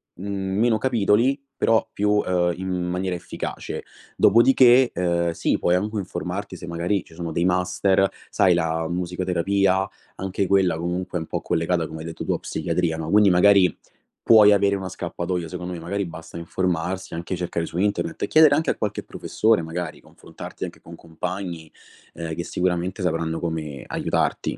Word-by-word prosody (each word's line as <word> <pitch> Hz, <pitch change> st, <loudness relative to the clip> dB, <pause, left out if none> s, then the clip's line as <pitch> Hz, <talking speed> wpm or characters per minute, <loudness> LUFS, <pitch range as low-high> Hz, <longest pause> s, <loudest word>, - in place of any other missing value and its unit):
mhmm, 95 Hz, 0 st, -3 dB
meno 115 Hz, 0 st, +3 dB
capitoli 120 Hz, +2 st, +2 dB, 0.2 s
però 115 Hz, -1 st, +3 dB
più, 105 Hz, +1 st, 0 dB
uhm, 90 Hz, -4 st, +1 dB
in 95 Hz, +1 st, -5 dB, 0.2 s
maniera 90 Hz, 0 st, -2 dB
efficace. -, -, -6 dB, 0.3 s
Dopodiché, 125 Hz, +2 st, +6 dB
uhm, 85 Hz, -1 st, +1 dB
sì, 80 Hz, -, 0 dB
puoi 90 Hz, -, +2 dB
anche 105 Hz, +4 st, -1 dB
informarti 95 Hz, -3 st, -4 dB
se -, -, -9 dB
magari 85 Hz, +3 st, -1 dB
ci -, -, -19 dB
sono 85 Hz, -1 st, -5 dB
dei 85 Hz, -, 0 dB
master, 90 Hz, +2 st, +2 dB, 0.2 s
sai, 95 Hz, -2 st, +3 dB
la 80 Hz, -1 st, 0 dB
musicoterapia, 90 Hz, +2 st, 0 dB, 0.3 s
anche 95 Hz, 0 st, -2 dB
quella 95 Hz, -4 st, +3 dB
comunque 90 Hz, +2 st, -3 dB
è -, -, -3 dB
un 80 Hz, -, -7 dB
po' -, -, -3 dB
collegata, 85 Hz, 0 st, 0 dB
come 80 Hz, 0 st, -8 dB
hai 80 Hz, -, -7 dB
detto 80 Hz, -1 st, -6 dB
tu, -, -, -2 dB
a -, -, +1 dB
psichiatria, 85 Hz, -3 st, -1 dB
no, 80 Hz, -1 st, -4 dB
quindi 105 Hz, +2 st, +5 dB
magari 90 Hz, -1 st, +5 dB, 0.5 s
puoi 105 Hz, -2 st, +7 dB
avere 100 Hz, 0 st, +3 dB
una 95 Hz, -1 st, -5 dB
scappatoia, 85 Hz, -1 st, -4 dB
secondo 90 Hz, +1 st, -5 dB
me. 85 Hz, -, -6 dB
Magari 100 Hz, +4 st, -2 dB
basta 80 Hz, -1 st, -9 dB
informarsi, 90 Hz, +2 st, -2 dB
anche 85 Hz, +3 st, -4 dB
cercare 85 Hz, -1 st, -3 dB
su 85 Hz, -, -7 dB
internet 90 Hz, -4 st, -1 dB
e -, -, 0 dB
chiedere 155 Hz, -2 st, +6 dB
anche 160 Hz, +2 st, 0 dB
a -, -, +1 dB
qualche 105 Hz, -2 st, -3 dB
professore, 110 Hz, -4 st, +1 dB
magari 85 Hz, +2 st, -5 dB
confrontarti -, -, -10 dB
anche -, -, -6 dB
con 85 Hz, -, -11 dB
compagni, 85 Hz, 0 st, -6 dB, 0.4 s
ehm, 80 Hz, -1 st, -5 dB
che 85 Hz, -, -4 dB
sicuramente 90 Hz, +1 st, -1 dB
sapranno 80 Hz, -2 st, -1 dB
come 80 Hz, -5 st, -4 dB
aiutarti. -, -, -1 dB
90 Hz, 170 wpm, -23 LUFS, 85-100 Hz, 0.5 s, puoi